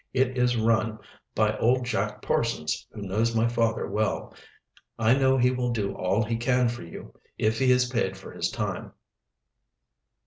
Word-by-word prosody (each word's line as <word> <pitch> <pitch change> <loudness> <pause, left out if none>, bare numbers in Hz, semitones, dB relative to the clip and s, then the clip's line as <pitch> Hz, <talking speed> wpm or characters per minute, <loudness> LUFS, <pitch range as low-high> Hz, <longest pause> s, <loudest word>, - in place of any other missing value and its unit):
"It 130 0 +1
is 125 -1 +2
rum 110 -1 +1 0.4
by 110 0 +2
old 125 +2 +2
Jack 105 -3 -2
Parsons, 80 -8 -1
who 105 - -8
knows 110 +4 0
my 115 +1 +3
father 115 -1 0
well. 110 0 -2 0.6
I 115 +1 +4
know 135 0 +3
he 125 0 +4
will 125 -1 -1
do 105 -4 -1
all 95 +5 0
he 115 +1 -2
can 125 +1 +2
for 120 0 -6
you, 85 -1 -10 0.2
if 110 +1 +1
he 130 - +3
is 125 0 +4
paid 120 -6 -1
for - - -11
his - - -2
time." - - -4
115 Hz, 170 wpm, -26 LUFS, 110-125 Hz, 0.6 s, I